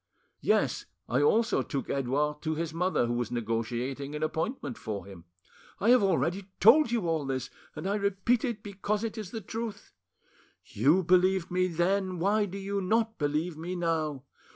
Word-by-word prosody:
Yes, - - +1 0.2
I 130 +4 +1
also 225 +10 +3
took 140 - -4
Edouard 145 +3 -1
to 155 -1 -1
his 165 0 -3
mother, 180 -6 +1
who 120 - -1
was 120 -2 -1
negotiating 120 +5 -3
an 150 - -3
appointment 160 - -2
for 105 -2 -5
him. 95 -4 -12 0.5
I 220 +5 +4
have 250 - +6
already 185 +1 0
told 260 +6 +7
you 225 -7 0
all 160 -2 0
this, 135 -2 -3 0.2
and - - -6
I 200 - +1
repeat 200 +4 +1
it 235 -5 -3
because 205 +1 -2
it 225 -1 -3
is 215 -5 -6
the 225 +3 -5
truth. 220 0 -6 0.7
You 150 - +3
believed 185 +1 +3
me 185 0 +2
then: 185 +2 0
why 205 +4 +2
do 195 +1 -7
you 200 0 -2
not 220 +3 0
believe 155 +3 -1
me 170 +4 -5
now? 160 -5 -1
175 Hz, 175 wpm, -29 LUFS, 145-200 Hz, 0.7 s, told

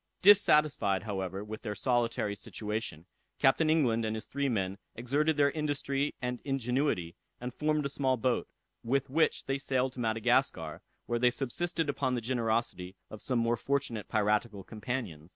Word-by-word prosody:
Dissatisfied, 150 - +5
however, 95 -2 -3
with 110 +1 -7
their 105 -3 -4
solitary 115 -2 0
situation, 105 -5 -5 0.3
Captain 155 +4 +3
England 125 -8 +3
and 110 0 -1
his 110 - -5
three 140 0 -1
men 100 -4 -1 0.2
exerted 145 +6 +1
their 140 -1 +4
industry 145 -2 -1
and 125 -1 -3
ingenuity, 125 - 0 0.2
and 125 0 -5
formed 150 0 0
a - - 0
small 130 -2 +1
boat, 125 +1 0 0.4
with 135 +2 0
which 160 +3 +2
they 135 0 -1
sailed 130 -1 0
to 130 - -9
Madagascar, 110 -1 +1 0.2
where 120 0 -1
they 125 +1 +5
subsisted 155 +6 -2
upon 135 -3 0
the - - 0
generosity 115 -6 -1 0.2
of 110 - -7
some 125 - 0
more 115 0 +2
fortunate 135 -4 -2
piratical 105 -1 0
companions. 105 - -5
125 Hz, 155 wpm, -31 LUFS, 110-140 Hz, 0.4 s, Dissatisfied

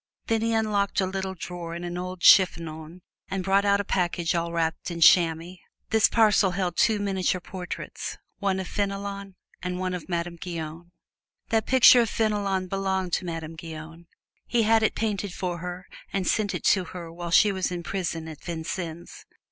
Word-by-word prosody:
Then 225 -1 0
he 230 0 0
unlocked 210 -3 +1
a 190 - +2
little 190 0 -3
drawer 175 -1 -6
in 170 - -6
an 175 0 -4
old 180 0 -5
chiffonier 165 -2 +4 0.3
and 190 -1 -2
brought 195 +2 +2
out 200 0 +3
a - - 0
package 175 -3 0
all 170 0 -1
wrapped 165 +1 -1
in 170 -1 -5
chamois. 170 +1 +4 0.3
This 220 -1 +5
parcel 215 -3 +4
held 180 -3 -1
two 220 +2 +3
miniature 190 -2 0
portraits, 180 0 -6 0.2
one 195 -2 0
of 190 - -4
Fenelon 200 -1 -4 0.3
and 180 0 -3
one 185 0 -2
of 180 0 -6
Madame 170 0 -2
Guyon. 165 -1 -6 0.6
"That 225 -1 +1
picture 255 -1 +7
of 230 - 0
Fenelon 205 -4 0
belonged 190 -1 -2
to - - 0
Madame 165 -1 -5
Guyon. 165 +1 -9 0.4
He 235 -2 +2
had 225 +1 +4
it 220 - +1
painted 205 -4 -2
for 180 -2 -3
her 180 +1 -6 0.3
and 190 -2 -1
sent 210 -2 +1
it - - -5
to 190 - +4
her 170 -1 -8
while 175 0 -6
she 205 +4 +5
was 190 -2 -2
in 175 -1 -4
prison 165 -3 -3
at 155 -2 -10
Vincennes. 170 - -6
185 Hz, 180 wpm, -26 LUFS, 170-200 Hz, 0.6 s, picture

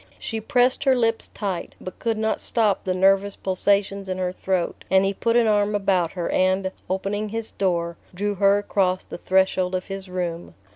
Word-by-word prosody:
She 225 -1 -4
pressed 245 +3 +2
her 265 -1 +5
lips 230 -2 +1
tight, 195 -5 -5
but 185 - -9
could 225 -2 -1
not 220 0 -1
stop 215 -4 +2
the 185 -1 0
nervous 195 +1 +3
pulsations 195 +1 0
in 185 - -2
her 180 -1 -1
throat, 185 -1 -2
and 190 0 +4
he 195 - 0
put 230 +4 0
an 240 - +4
arm 210 -1 +2
about 190 -4 +1
her 175 -3 -3
and, 185 0 +1 0.2
opening 200 +3 -2
his 225 +1 -4
door, 170 -3 -1
drew 205 +3 -2
her 200 +1 +4
across 190 -2 0
the - - -9
threshold 185 0 +1
of 185 - -3
his 195 -1 -7
room. 175 -2 -4
195 Hz, 190 wpm, -23 LUFS, 185-205 Hz, 0.2 s, her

